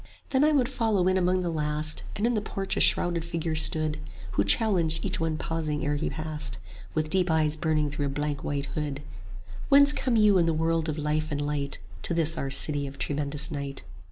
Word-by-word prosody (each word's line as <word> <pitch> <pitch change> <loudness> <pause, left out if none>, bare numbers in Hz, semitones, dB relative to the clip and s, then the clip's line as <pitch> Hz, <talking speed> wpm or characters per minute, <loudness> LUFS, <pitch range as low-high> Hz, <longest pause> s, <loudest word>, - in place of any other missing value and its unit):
Then 265 0 +3
I 305 - +4
would 270 -5 +3
follow 215 -7 0
in 185 - +3
among 185 0 +2
the 175 -1 -2
last: 150 0 -1
And 205 - -1
in 240 - +2
the 215 - 0
porch 195 -2 -3
a - - -1
shrouded 170 -2 +2
figure 170 -1 -3
stood, 155 0 +2 0.3
Who 100 +1 +1
challenged 170 - +1
each - - -1
one 160 -1 -1
pausing 155 -3 -3
ere 145 - 0
he 145 - -2
passed, 155 - -4 0.4
With 155 0 -1
deep 185 -1 +1
eyes 155 -1 +2
burning 155 -2 0
through 145 -1 -2
a - - -2
blank 145 +1 -3
white 140 -1 -2
hood: 150 -2 -2
10 145 +1 -10 0.6
Whence 285 +1 +7
come 260 -4 0
you 210 -3 +5
in 170 - +2
the 165 - +1
world 165 0 0
of 155 - -3
life 155 +1 -1
and 145 - -2
light 145 -1 -2 0.2
To 170 - 0
this 165 -1 +3
our 135 - -3
City 145 +1 +2
of 135 +1 -10
Tremendous 145 +2 -3
Night? 140 -2 -5
155 Hz, 215 wpm, -27 LUFS, 150-180 Hz, 0.6 s, Whence